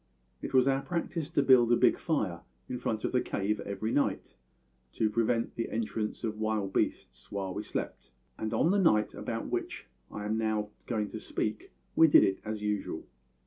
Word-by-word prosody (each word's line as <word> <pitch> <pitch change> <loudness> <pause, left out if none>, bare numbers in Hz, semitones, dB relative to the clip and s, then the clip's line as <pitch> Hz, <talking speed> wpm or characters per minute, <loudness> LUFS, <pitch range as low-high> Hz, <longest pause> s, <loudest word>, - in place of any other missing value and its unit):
It - - -5
was 130 0 +5
our 135 0 +2
practice 165 -1 -3
to 145 -4 +2
build 125 -3 +6
a - - +7
big - - +4
fire 100 - -1 0.3
in 125 - -4
front 110 -2 -2
of - - 0
the 125 - +2
cave 105 +2 -1
every 100 +3 -3
night, 145 - 0 0.6
to 110 -1 +1
prevent 115 +1 +1
the 115 - -3
entrance 110 0 -3
of 110 -1 -3
wild 110 -3 -1
beasts - - -2
while 95 -2 -3
we - - -3
slept, - - -5 0.3
and 110 - -3
on 165 - +3
the 200 - +3
night 110 - +3
about - - -4
which - - -3 0.2
I 105 - -6
am 110 +1 0
now 110 -1 0 0.2
going 105 -4 -1
to 110 - -5
speak 105 0 -3 0.2
we 160 - +7
did 145 - +7
it 95 - +1
as 110 -1 -4
usual. 105 -1 -2
110 Hz, 190 wpm, -30 LUFS, 105-125 Hz, 0.6 s, a